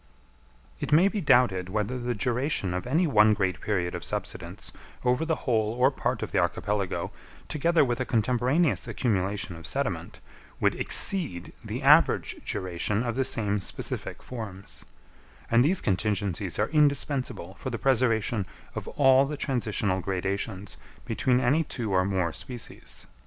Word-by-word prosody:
It - - -4
may 170 +6 +6
be 210 -1 -3
doubted 110 - +3
whether 110 +5 -2
the 120 0 -2
duration 125 - 0
of 90 +5 -3
any 160 +8 +2
one 110 -7 +5
great 95 -3 -1
period 90 -4 -1
of - - -5
subsidence - - -5 0.3
over 125 +5 +2
the 160 0 +1
whole 110 -3 +1
or 130 +3 +4
part - - -2
of - - -5
the - - +2
archipelago, 100 -2 -1 0.4
together 160 0 +2
with 120 -1 -1
a 130 - -1
contemporaneous 125 +8 +1
accumulation 100 -5 -1
of 80 0 -7
sediment, - - -3 0.4
would - - +3
exceed 155 - +1
the - - -5
average - - +5
duration 95 +4 -1
of 120 - -2
the 135 - +1
same 105 -5 0
specific 95 - -5
forms; 100 -6 -6 0.7
and 115 +1 +5
these 180 +6 +2
contingencies 100 -3 -1
are 105 - +1
indispensable 140 - +1
for - - -4
the 120 - -3
preservation 115 -5 +1 0.3
of - - -6
all 135 -1 +4
the 150 +1 -4
transitional 105 -8 0
gradations 95 +1 -3 0.3
between 125 +1 +1
any 140 +6 +2
two 120 -8 -4
or 95 0 +4
more 95 -4 0
species. 125 -4 -8
115 Hz, 150 wpm, -27 LUFS, 100-130 Hz, 0.7 s, may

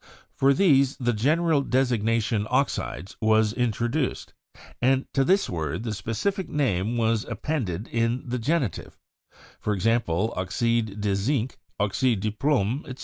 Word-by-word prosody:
For 135 +1 +4
these 140 -4 +3
the 120 -3 0
gen 135 +10 +2
eral 155 -5 +1
designation 115 -4 +1
'oxides' 125 -7 -1
was 110 -1 +3
introduced, 120 +4 -1 0.5
and 130 +1 +3
to 135 - +3
this 190 +8 +3
word 80 +2 -3
the 115 -3 -3
specific 115 - -2
name 115 -5 0
was 115 -1 +1
appended 110 - -3
in 115 +2 0
the 125 +1 -2
genitive; 135 - -2 0.6
for 105 - -1
ex 95 - -4
ample, 115 -2 +1
'oxide 105 +3 -1
de 100 -1 +1
zinc/ 120 +4 -1 0.2
'oxide 105 +3 +1
de 110 +1 -1
plomb,' 130 +1 0
etc. 130 -1 -8
115 Hz, 145 wpm, -25 LUFS, 105-135 Hz, 0.6 s, For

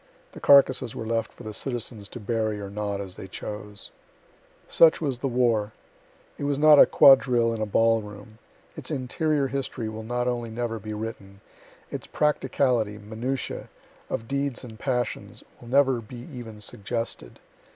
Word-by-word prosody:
The - - -11
carcasses 130 -4 +5
were 110 - -5
left 115 0 -1
for - - -14
the 110 -1 -6
citizens 115 -3 -3
to 120 - -8
bury 110 -1 -1
or 100 -1 -7
not, 100 -1 -3
as 95 -2 -7
they - - -8
chose.) 105 +1 -7 0.8
Such 165 -1 +5
was 135 -6 -2
the 135 - -1
war. 115 -4 +1 0.7
It 145 - -2
was 140 -1 0
not 150 0 +7
a - - +9
quadrille 125 -4 +6
in 110 - -4
a 110 - -1
ball 115 +2 +3
room. 105 +1 -12 0.4
Its - - -7
interior 145 +1 0
history 130 -4 -3
will 110 0 -6
not 120 +2 -2
only 120 -2 -2
never 115 0 -3
be 110 +1 -6
written 105 -3 -7 0.5
its - - -6
practicality, 125 -7 +1
minutia; 115 +5 -4 0.4
of 115 - -4
deeds 140 -1 -2
and 115 -3 -10
passions, 125 -3 -3 0.2
will 120 - -12
never 130 -1 +3
be 115 +3 -11 0.2
even 115 -4 -9
suggested. 105 - -5
115 Hz, 160 wpm, -26 LUFS, 110-130 Hz, 0.8 s, a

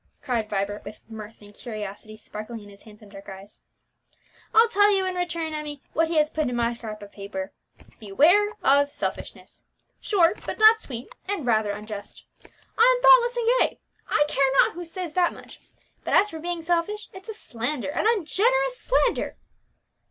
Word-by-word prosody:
cried 235 -6 -1
Vibert, 205 +1 -2
with 205 +1 -10
mirth 220 -1 -10
and 205 0 -15
curiosity 215 -1 -8
sparkling 215 +1 -8
in 205 - -14
his 200 0 -16
handsome 210 -1 -16
dark 195 0 -12
eyes. 195 +2 -12 0.9
"I'll 450 +1 +6
tell 410 -2 +4
you 385 -2 +2
in 370 - -2
return, 335 -3 -3
Emmie, 300 -2 -6
what 325 +1 +2
he 330 - -3
has 305 0 +3
put 310 -4 -1
in 245 - -3
my 235 0 +1
scrap 215 -3 -8
of 200 - -12
paper: 195 -1 -6 0.5
Beware 310 - +4
of 280 +1 +4
Selfishness. - - -6 0.3
Short 370 -2 +2
but - - -5
not 440 +1 +7
sweet, 245 -2 -8 0.2
and 400 -9 -2
rather 220 -3 +2
unjust. 210 0 -7 0.5
I - - +6
am - - -8
thoughtless - - +6
and 470 -1 -1
gay, - - +1 0.3
I 295 - +3
care 275 -2 +2
not - - +5
who 350 +2 -7
says 335 -1 -6
that 360 -1 +2
much; - - -13 0.4
but - - 0
as 420 - +4
for 320 - -7
being 345 0 -4
selfish, 350 +5 -1
it's 380 +3 -12
a 440 - -5
slander, 250 - -4
an 370 - 0
ungenerous 470 +6 +1
slander!" - - 0
295 Hz, 180 wpm, -25 LUFS, -, 0.9 s, not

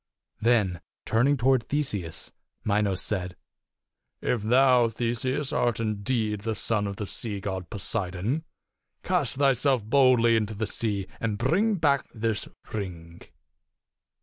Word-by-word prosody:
Then 105 -7 +2 0.2
turning 135 +6 +2
toward 130 -1 +2
Theseus, 105 - -2 0.3
Minos 100 -2 +1
said, 90 -3 -2 0.5
" - - -58
If 120 - -2
thou, 125 +1 +4
Theseus, 120 +5 -1
art 120 -3 +1
indeed 110 0 -1
the 110 +2 -3
son 105 -1 0
of 100 - -4
the 105 - -4
sea 105 0 +1
god, 95 -3 -5
Poseidon, 105 - -1 0.6
cast 175 -10 +1
thyself 135 -3 +2
boldly 120 -1 +4
into 110 -1 -1
the 110 +2 -2
sea 100 -3 -1
and 110 -3 -2
bring 200 - +2
back 145 -6 +1
this 110 -1 -1 0.3
ring." 85 -5 -6
115 Hz, 125 wpm, -26 LUFS, 100-130 Hz, 0.6 s, thou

